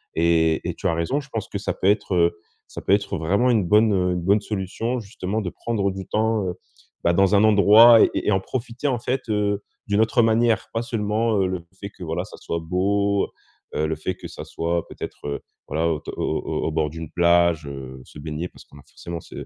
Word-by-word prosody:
et 80 -1 +2
et - - -2
tu - - -2
as 85 - +1
raison 85 - 0
je 135 - -10
pense 110 -5 -4
que 100 - -3
ça 100 - -2
peut 95 - -1
être, 105 -1 +2
heu, 85 -1 +2 0.3
ça - - -8
peut - - -1
être 100 -1 +1
vraiment 100 +10 +2
une 110 -6 +3
bonne, 105 +4 +4
heu, 90 -1 +1
une 90 - -2
bonne 100 +4 +3
solution, 110 +5 -3
justement, 105 0 -4
de 90 - -3
prendre 105 -2 -2
du 95 0 -7
temps, 110 -2 0
heu, 90 - -3 0.5
bah, 85 - +3
dans 95 +3 +3
un 100 - +5
endroit 110 +2 +8
et - - +3
et - - 0
en 95 - +3
profiter 120 +6 -4
en 125 -4 0
fait, 130 +2 -2
heu, 105 -1 0 0.2
d'une 105 +1 +2
autre 115 +2 +3
manière. 115 -1 +2
Pas 115 - 0
seulement, 110 0 0
heu, 95 - +2
le 90 -2 -4
fait 100 - -6
que 95 - -12
voilà 85 +2 -3
ça - - -12
soit 85 - -4
beau, 100 +4 +1
heu - - -13 0.5
heu, 80 - +1
le 80 - -1
fait 80 +5 -3
que - - -9
ça - - -8
soit 85 0 -2
peut-être, - - -8
heu, 70 - -3 0.3
voilà, 80 +3 0
au 80 -2 -1
t - - -8
au - - -5
au - - -2
au - - -1
bord 75 -1 0
d'une 80 -1 -7
plage, 85 -2 +3
heu, 65 -2 -8
se 75 - -13
baigner 80 +3 -5
parce - - -16
qu'on 70 - -17
a 70 - -16
forcément 85 -1 -7
ce - - -9
95 Hz, 240 wpm, -23 LUFS, 85-110 Hz, 0.5 s, endroit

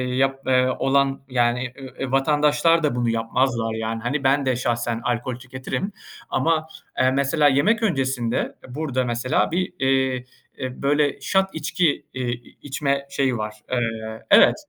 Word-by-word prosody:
yap, 135 +1 +1
eee, 130 -1 +4
olan 135 0 +2
yani, 120 0 +1
e - - -13 0.2
eee, 130 - -3
vatandaşlar 150 +4 +3
da 145 -5 +1
bunu 120 -1 +1
yapmazlar 115 0 0
yani. 110 0 -3
Hani, 135 +5 -2
ben 135 +1 +3
de 130 -1 +2
şahsen 120 -1 -1
alkol 120 +1 -1
tüketirim. 130 - -5 0.4
Ama, 160 -1 +1 0.3
eee, 130 0 +4
mesela 140 +3 +3
yemek 210 +12 +3
öncesinde, 130 - 0 0.3
e, 125 - -10
burada 135 -4 -1
mesela 120 +4 0
bir, 180 +2 -1
eee, 130 -1 +1 0.3
e, 130 -1 -5
böyle 145 0 +1
shot 190 0 +2
içki, 160 0 0
eee, 130 -1 -2
i 120 0 -9
içme 140 0 -1
şeyi 135 -3 0
var. 105 0 -4 0.2
Eee, 110 -2 -2
evet, - - +7
130 Hz, 155 wpm, -23 LUFS, 120-145 Hz, 0.4 s, evet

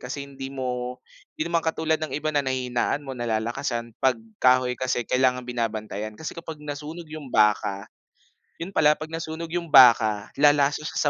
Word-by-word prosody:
kasi 140 +3 -5
hindi 135 -1 -8
mo, 125 -2 -4 0.4
hindi 155 - -1
naman 170 - +3
katulad 160 -1 0
ng 155 - -2
iba 155 +1 -2
na 145 - +2
nahihinaan 130 +1 -1
mo, 135 - -6
nalalakasan, 120 +1 -2
pag 130 -2 +3 0.2
kahoy 125 0 +4
kasi 125 -1 0
kailangang 125 +1 +1
binabantayan 110 -3 -4
kasi 160 - -6
kapag 165 -2 -8
nasunog 150 +3 -6
'yung 155 -3 -8
baka, 105 -3 +2 0.7
'yun 170 +3 -6
pala 150 -3 +4
'pag 155 +1 -8
nasunog 165 0 -5
'yung 175 0 -2
baka, 110 -7 +6
lalasa 145 0 +4
siya 160 - -6
130 Hz, 160 wpm, -25 LUFS, 120-155 Hz, 0.7 s, baka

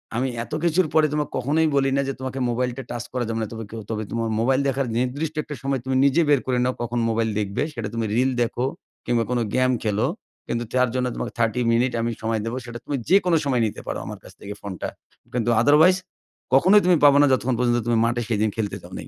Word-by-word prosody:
আমি 125 +3 0 0.2
এত 135 - -11
কিছুর 170 +1 +2
পরে 155 -1 +5
তোমাকে 150 -1 -1
কখনোই 150 +6 +2
বলি 135 -1 +3
না - - +3
যে, 135 - -1
তোমাকে 130 0 -4
মোবাইলটা 125 +2 -2
টাচ 120 -1 -4
করা 125 -1 -1
যাবে 115 0 -2
না। 110 - -2
তবে 115 -1 -6
কেও 115 0 -7
তবে 110 -1 -2
তোমার 115 -1 -1
মোবাইল 130 +3 +2
দেখার 135 -1 0
নির্দিষ্ট 145 +6 -2
একটা 150 - -7
সময় 135 -1 0
তুমি 130 0 -1
নিজে 140 +4 +4
বের 145 -2 +5
করে 130 -1 0
নাও, 125 - +1
কখন 120 0 -2
মোবাইল 115 0 0
দেখবে? 105 +5 -1
সেটা 115 -5 -4
তুমি 115 -1 -1
রিল 130 +2 +2
দেখো 120 +1 0 0.4
কিংবা 120 -1 +1
কোনো 125 -1 +1
গেম 130 0 +3
খেলো। 105 -1 +1 0.4
কিন্তু 120 0 -2
তার 125 -1 +3
জন্য 125 0 +1
তোমাকে - - -4
30 115 +2 +1
মিনিট 120 +2 +2
আমি 115 +1 -1
সময় 110 0 -1
দিবো। 115 +2 -3
সেটা 120 -1 -7
তুমি 145 - -2
যেকোন 185 -1 +4
সময় 130 -4 +1
নিতে 105 - -4
পারো, - - -3
আমার - - -7
কাছ - - -13
থেকে 100 - -6
ফোনটা। 95 -3 -5 0.5
কিন্তু 120 -1 0
আদারওয়াইজ, 150 +8 +6 0.6
কখনোই 190 +10 +6
তুমি 180 -1 +5
পাবা 140 -1 +7
না, - - +6
যতক্ষণ 130 -1 +1
পর্যন্ত 120 -1 +2
তুমি 120 -1 +2
মাঠে 120 +1 0
সেদিন 110 -1 +1
খেলতে 105 -3 -2
যাও - - -13
নাই - - -7
125 Hz, 230 wpm, -23 LUFS, 115-135 Hz, 0.6 s, পাবা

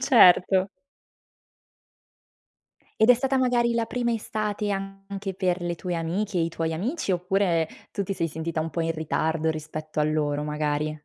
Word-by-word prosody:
Certo. 190 -6 +6 2.3
Ed 220 - +6
è - - +9
stata 270 +3 0
magari 240 -2 +2
la 230 -1 +1
prima 240 0 -1
estate 210 -1 -2
anche 195 0 -5
per 180 -1 0
le 175 0 -1
tue 180 +1 -4
amiche 180 +4 -1
e - - +2
i - - -1
tuoi 165 0 -2
amici 215 - -2
oppure, 180 -2 +1 0.2
tu 200 - -2
ti 195 - -3
sei 165 -3 -1
sentita 160 +1 -3
un 160 +1 -3
po' 170 - -2
in 165 0 0
ritardo 160 0 0
rispetto 155 0 -6
a 150 - +4
loro, 150 -1 0
magari? 150 0 -1
180 Hz, 165 wpm, -26 LUFS, 160-205 Hz, 2.3 s, è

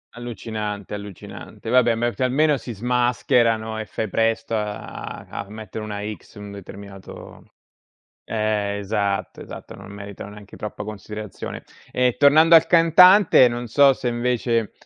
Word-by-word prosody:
Allucinante, 110 -4 -6
allucinante, 105 +2 -8
vabbè 120 -2 +4
ma 120 - -1
è 120 - +1
f - - -23
almeno 145 +4 +2
si 120 +1 -8
smascherano 115 -1 +1
e 110 - -4
fai 110 -2 -4
presto 115 +1 0
a 105 -1 -6
a 100 - -6
mettere 110 0 -8
una 105 -1 -5
X - - -22
in 105 - -9
un 100 - -9
determinato 100 0 -12 0.7
eh, 105 -2 -1
esatto, 100 -1 -2
esatto, - - -10
non 95 - -12
meritano 100 0 -9
neanche 105 -1 -13
troppa 105 0 -6
considerazione. 105 0 -8 0.3
Ehm, 125 -1 +2
tornando 155 +4 +6
al 165 - +5
cantante, 175 -2 +6
non 120 +1 -5
so 140 +4 +5
se 130 -1 -6
invece 120 -2 -1
110 Hz, 145 wpm, -22 LUFS, 105-125 Hz, 0.7 s, tornando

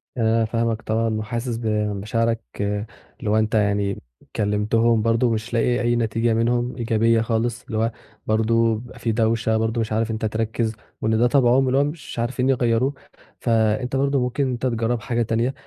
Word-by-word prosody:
أنا 115 -2 +2
فاهمك 115 0 -1
طبعًا، 110 0 0
وحاسس 115 +2 -3
بمشاعرك 110 +1 -1 0.8
اللي 105 - -3
هو 110 - +3
أنت 110 +1 0
يعني 100 -2 +1 0.3
كلمتهم 110 +2 +2
برضه 115 +2 +2
مش 115 +1 -3
لاقي 120 +1 +2
أي 120 0 +2
نتيجة 115 0 +1
منهم 120 +2 0
إيجابية 115 -1 +2
خالص 115 +1 -1
اللي 110 -4 -4
هو 115 +2 +1 0.4
برضه 115 +1 +2
بيبقى 120 +2 -11
في 115 - -1
دوشة، 110 0 +1
برضه 110 +1 0
مش 110 - -3
عارف 110 +1 0
إن - - -2
أنت 110 - -3
تركِّز 110 +1 -1 0.3
وإن 110 0 +1
ده 120 +2 +4
طبعهم، 130 0 +4
واللي 130 +1 +1
هو - - +4
مش 145 -4 -5
عارفين 125 +2 0
يغيّروه، 125 +1 +2 0.5
فأنت 115 +2 +1
برضه 140 +1 +2
ممكن 125 +3 0
إن 130 - -1
أنت 125 +1 -3
تجرّب 115 -1 0
حاجة 120 +2 -1
تانية، 115 +3 0
115 Hz, 175 wpm, -22 LUFS, 110-120 Hz, 0.8 s, ده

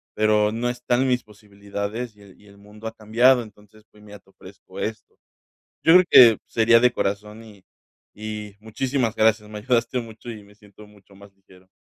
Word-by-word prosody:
pero 105 0 +2
no 120 +2 -2
está 120 0 -2
en 130 +2 +1
mis 125 -2 0
posibilidades 105 +2 -7
y 105 - -22
el 100 -2 -18
y - - -22
el 100 - -18
mundo 105 +2 -12
ha - - -5
cambiado. 120 +4 +3
Entonces, 105 -1 -17
pues, 105 - -21
mira, 105 -1 -13
te - - -30
ofrezco - - -15
esto". 110 0 -6 0.7
Yo 160 - +5
creo 180 +1 +7
que 115 -4 +8
sería 115 +1 +3
de 125 +1 +3
corazón 105 +2 -4
y 105 -4 -17 0.5
y 105 -1 -7
muchísimas 120 +1 -2
gracias, 110 -1 +1
me 105 - -8
ayudaste 120 +2 -1
mucho 115 +1 -10
y 110 -2 -10
me 100 +1 -21
siento 105 0 -18
mucho 100 -1 -22
más 100 0 -17
ligero. 95 -1 -23
110 Hz, 195 wpm, -22 LUFS, 105-115 Hz, 0.7 s, que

